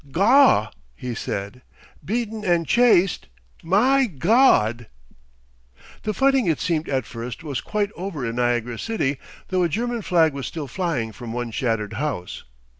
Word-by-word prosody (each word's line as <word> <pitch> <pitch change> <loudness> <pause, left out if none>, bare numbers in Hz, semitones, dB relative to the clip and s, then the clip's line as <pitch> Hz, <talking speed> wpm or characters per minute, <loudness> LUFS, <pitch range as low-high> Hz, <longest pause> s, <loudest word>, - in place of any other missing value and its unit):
"Gaw!" 200 - +4 0.2
he 125 - -5
said. 100 +2 -5 0.4
"Beaten 220 0 -3
and 175 -3 +1
chased! 215 -5 +3 0.3
My 250 +10 +3
Gawd!" 145 - +3 1.1
The 215 - -2
fighting, 270 -4 +3
it 160 -3 +1
seemed 165 -2 -1
at 130 -4 -1
first, 115 +7 -7
was 140 -5 -3
quite 205 -1 -2
over 175 -7 -5
in 115 +1 -4
Niagara 120 -1 0
city, 145 -12 -2 0.3
though 185 -1 +1
a 175 - +2
German 235 +6 -2
flag 165 -6 +2
was 140 -2 -5
still 155 -4 -6
flying 145 -8 -2
from 115 0 -8
one 120 -1 -4
shattered 115 -2 -2
house. 115 -7 -4
160 Hz, 145 wpm, -23 LUFS, -, 1.1 s, Gaw